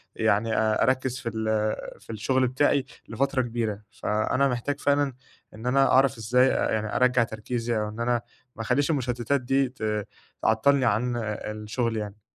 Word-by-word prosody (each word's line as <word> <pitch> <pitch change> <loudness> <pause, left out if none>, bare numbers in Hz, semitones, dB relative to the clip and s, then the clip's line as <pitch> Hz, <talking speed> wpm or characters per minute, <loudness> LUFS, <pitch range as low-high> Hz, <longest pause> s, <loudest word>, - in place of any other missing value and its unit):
يعني 110 +2 +1
آآ 110 -1 +2
أركّز 130 0 0
في 120 -2 -3
ال 110 -1 0 0.3
في - - -21
الشغل 130 +4 +1
بتاعي 135 +2 +2 0.2
لفترة 135 0 0
كبيرة. 115 -4 -3
فأنا 110 +6 0
محتاج 135 +3 -2
فعلًا 145 -1 +1 0.4
إن 110 +3 -10
أنا 135 +2 +3
أعرف 130 -2 +4
إزاي 125 +4 +3
آآ - - 0
يعني 110 -1 -2
أرجّع 125 -1 +4
تركيزي 115 +1 -3
أو 105 0 -2
إن 110 +2 -9
أنا 120 0 +1 0.3
ما - - -6
أخلّيش 140 +7 +1
المشتتات 125 -1 0
دي 135 +1 +1
ت 105 -4 -3 0.3
تعطلني 130 +5 +3
عن 120 +2 +1
أ - - -1 0.3
أ - - -2
الشغل 110 +2 -2
يعني. 105 0 -5
120 Hz, 170 wpm, -26 LUFS, 110-130 Hz, 0.4 s, أعرف